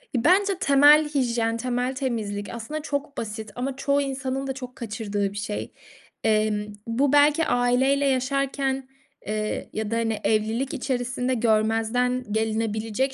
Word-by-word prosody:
Bence 370 - +3
temel 295 +1 +6
hijyen, 235 -5 0
temel 250 +2 -1
temizlik 215 -6 -3
aslında 235 +7 -5
çok 285 -1 -4
basit 220 -1 -5
ama 255 +2 -3
çoğu 280 +1 +1
insanın 270 0 -3
da 265 - -2
çok 255 -1 -8
kaçırdığı 210 -3 -3
bir 205 - -8
şey. 205 +1 -4 0.5
Emm, 215 -1 +1 0.2
bu 260 +5 +1
belki 295 +2 +5
aileyle 250 +3 +2
yaşarken, 270 0 0 0.4
eee, 215 0 -3
ya 215 0 -3
da, - - +1
hani, 225 -2 0
evlilik 220 +5 0
içerisinde 250 -2 -1
görmezden 225 +2 +1
gelinebilecek 220 +3 -1
245 Hz, 135 wpm, -25 LUFS, 220-275 Hz, 0.5 s, temel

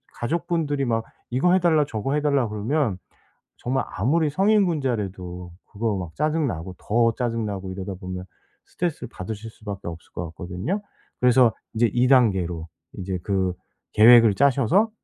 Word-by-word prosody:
가족분들이 155 0 -1
막 115 -2 0 0.3
이거 135 +9 +2
해달라 170 -5 +4
저거 115 +4 -2
해달라 140 -5 +1
그러면 110 0 -1 0.6
정말 130 +2 -1
아무리 150 - +1
성인군자라도 125 - 0 0.2
그거 110 -1 -1
막 85 -3 -6
짜증 155 0 +1
나고 90 -1 -5
더 115 +1 +2
짜증 115 -3 -1
나고 95 -2 -5
이러다 95 +1 -5
보면 90 0 -6 0.4
스트레스를 165 -8 -3
받으실 110 +3 -6
수밖에 100 -4 -7
없을 85 -1 -10
것 85 - -4
같거든요. 95 - -4 0.4
그래서 125 -2 +5 0.2
이제 115 +1 +3
2 120 +2 +3
단계로 95 -10 +2 0.3
인제 95 -2 -4
그 95 -3 0 0.4
계획을 115 -1 +7
짜셔서 140 - +3
115 Hz, 325 characters per minute, -24 LUFS, 95-145 Hz, 0.6 s, 계획을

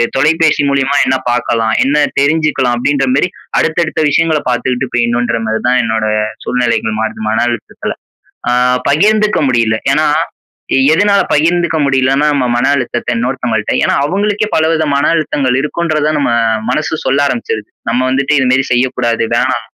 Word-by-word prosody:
தொலைபேசி 155 +2 +2
மூலியமா 140 0 0
என்ன 130 +1 +1
பாக்கலாம்? 115 -2 0
என்ன 140 +2 +1 0.2
தெரிஞ்சுக்கலாம்?" 145 -4 +1
அப்படீன்ற 135 +2 0
மாரி 175 +6 +1 0.3
அடுத்த, 160 - -1
அடுத்த 160 - -3
விஷயங்கள 160 +1 +1
பாத்துகிட்டு 125 +1 -1
போயிடணும்ன்ற 120 0 0
மாரி 110 0 -1
தான், 125 0 +3
என்னோட 110 -1 -1 0.4
சூழ்நிலைகள் 115 -3 -1
மாறுது 110 0 -4
மன 110 +2 +1
அழுத்தத்தில. 120 -2 -5 0.6
அ - - +2 0.4
பகிர்ந்துக்க 210 +7 +2
முடியல. 115 -3 +1 0.2
ஏன்னா 155 +2 +2 0.9
எதுனால 200 +5 +3
பகிர்ந்துக்க 170 +2 +1
முடியலன்னா, 135 +1 +1
நம்ம 135 -3 0
மன 120 +2 +1
அழுத்தத்த 125 -3 -3
இன்னொருத்தவங்கள்ட்ட, 120 -3 -2
ஏன்னா - - +1
அவுங்களுக்கே 205 +6 -1
பலவித 160 0 +1
மன 140 - +1
அழுத்தங்கள் 140 -5 0
இருக்குன்றத 155 0 -1
நம்ம 145 - 0 0.4
மனசு 155 +1 -1
சொல்ல 135 +2 +1
ஆரம்பிச்சுருது. 110 -4 -3 0.2
நம்ம 120 +2 0
வந்துட்டு 135 +3 0
இது 135 - +2
மாரி 135 +1 +2
செய்யக்கூடாது, 125 -2 0
வேணாம். - - 0
135 Hz, 145 wpm, -13 LUFS, 120-155 Hz, 0.9 s, தான்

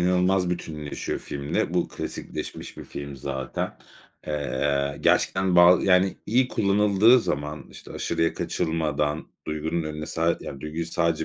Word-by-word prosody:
inanılmaz 90 +1 +2
bütünleşiyor 75 -4 -4
filmle. 70 0 -2
Bu - - +1
klasikleşmiş - - -6
bir - - -8
film 70 -1 -7
zaten. 65 -1 -4 0.5
Eee, 70 -1 -1
gerçekten 95 -1 +2
ba 90 +1 +8
yani, 95 0 +3
iyi 125 +4 +3
kullanıldığı 105 +4 +4
zaman, 75 -6 -3
işte, - - -12
aşırıya 80 - 0
kaçılmadan 75 -2 -1 0.2
duygunun 80 +2 -2
önüne 75 0 -5
sad 85 +1 0
yani, 70 - -7
duyguyu 80 +3 -4
sadece 85 -1 0
80 Hz, 130 wpm, -25 LUFS, 75-90 Hz, 0.5 s, ba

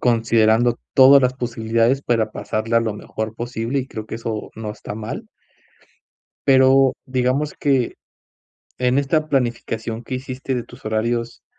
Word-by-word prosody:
considerando 115 0 +3 0.2
todas 135 +1 +8
las 125 -1 +1
posibilidades 115 +1 0
para 115 -5 0
pasarla 115 +2 0
lo 110 -2 -2
mejor 110 +1 -5
posible, 120 +3 -2
y 130 - -6
creo 110 -4 -7
que - - -6
eso 115 -1 -5
no 110 -1 -5
está 105 -1 -8
mal. 115 - -6 1.2
Pero 135 0 +5
digamos 130 +3 0
que, 135 -4 +1 0.8
en 125 +1 +1
esta 155 +2 +1
planificación 120 -4 -2
que 130 - -4
hiciste 130 +1 -4
de 120 - -2
tus - - -16
horarios, 115 +2 -2
120 Hz, 140 wpm, -21 LUFS, 110-130 Hz, 1.2 s, todas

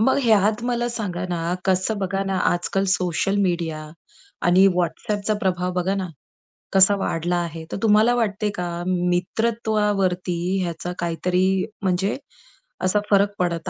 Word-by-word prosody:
मग 265 +5 +3
ह्यात 215 -1 +3
मला 240 -1 0
सांगा 195 -7 -3
ना 170 0 -2
कसं 190 +3 +1
बघा 195 0 -1
ना 195 -1 -1
आजकल 185 +3 0
सोशल 180 +2 0
मीडिया 170 -4 -1 0.7
आणि 185 +2 +6
WhatsAppचा 205 +4 -1
प्रभाव 180 -1 -1
बघा 185 +2 0
ना 190 -2 -3 0.7
कसा 195 +1 +7
वाढला 175 -2 -1
आहे 165 -1 -6
तर - - -3
तुम्हाला 220 +2 +4
वाटते 210 -3 0
का 180 -1 -3 0.2
मित्रत्वावरती 185 0 0 0.3
ह्याचा 175 +1 -4
काहीतरी 180 +2 0 0.4
म्हणजे 190 +1 0 0.7
असा 185 +3 +2
फरक 200 0 +4
पडत 175 -1 -1
185 Hz, 130 wpm, -22 LUFS, 175-210 Hz, 0.7 s, कसा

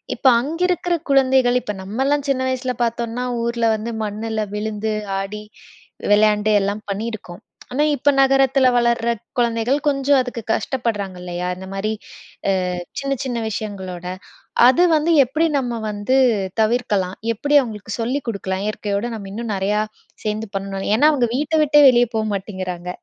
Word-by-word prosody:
இப்ப - - +1
அங்க 310 +6 -5
இருக்கிற 355 0 0 0.2
குழந்தைகள் 260 -2 +4
இப்ப 210 - -3
நம்ம 205 +6 -6
எல்லாம் 285 0 +1
சின்ன 265 -1 +1
வயசுல 255 0 -2
பார்த்தோம்னா, 235 +1 -3 0.2
ஊர்ல 235 0 0
வந்து 225 +2 -5
மண்ணுல 215 +1 -3
விழுந்து, 215 0 -2 0.3
ஆடி, 205 +2 -5 0.7
விளையாண்டு, 210 0 +4
எல்லாம் 200 +2 -2
பண்ணி 210 +4 -3
இருக்கோம். 185 -2 -9 0.3
ஆனா 290 +4 +2
இப்ப 285 +2 +2
நகரத்துல 270 -1 +4
வளர்ற 235 -1 +2 0.3
குழந்தைகள், 235 +2 +1
கொஞ்சம் 280 0 +3
அதுக்கு 250 -2 -5
கஷ்டப்படுறாங்க 220 -7 -2
இல்லையா? 180 0 -4
இந்த 190 +1 -9
மாரி 205 +2 -2 0.8
அ - - -3 0.2
சின்ன 275 0 -2
சின்ன 245 -3 -2
விஷயங்களோட. 190 -4 -5 0.6
அது 260 +8 +5
வந்து 310 +2 +2
எப்படி 310 +6 0
நம்ம 240 -3 -3
வந்து 210 +5 0 0.4
தவிர்க்கலாம்? 210 -5 0 0.2
எப்படி 290 +6 +3
அவங்களுக்கு 220 -3 -6
சொல்லி 255 +5 -1
குடுக்கலாம்? 195 -2 -3
இயற்கையோட 210 +1 -2
நம்ம 200 -3 -8
இன்னும் 225 0 -3
நெறைய 195 +2 0 0.5
சேர்ந்து 215 +1 -2
பண்ணனும்னு? 195 0 -3
ஏன்னா 295 +7 +5
அவங்க 255 -5 +1
வீட்ட 300 +4 0
விட்டே 295 0 +5
வெளிய 245 -1 +4
போ 220 - +2
மாட்டேங்கிறாங்க. 185 -3 -5
225 Hz, 150 wpm, -20 LUFS, 205-260 Hz, 0.8 s, அது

